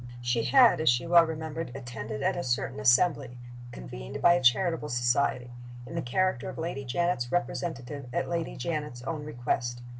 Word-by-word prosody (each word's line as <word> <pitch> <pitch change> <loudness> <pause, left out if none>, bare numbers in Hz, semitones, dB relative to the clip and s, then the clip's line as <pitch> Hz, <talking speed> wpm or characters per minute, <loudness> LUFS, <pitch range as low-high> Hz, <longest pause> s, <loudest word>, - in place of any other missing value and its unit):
She 120 -1 -1
had, 245 -10 +5
as 160 - +4
she 120 +3 +2
well 170 -1 +6
remembered, 160 -2 -5
attended 115 -4 -6
at - - +1
a - - -3
certain 120 -4 -2
assembly 125 +2 +3 0.3
(convened 60 - -8
by 175 - +6
a 175 - +1
charitable 160 +4 +2
society) 120 0 0 0.3
in 130 - -9
the 165 - -2
character 155 +1 0
of - - -8
Lady 160 -4 -4
Janet's 130 -2 -1
representative, 145 -6 -3
at - - -1
Lady 170 -1 -3
Janet's 150 -7 -4
own 155 +1 -4
request. 120 -3 -3
135 Hz, 170 wpm, -28 LUFS, 120-165 Hz, 0.3 s, well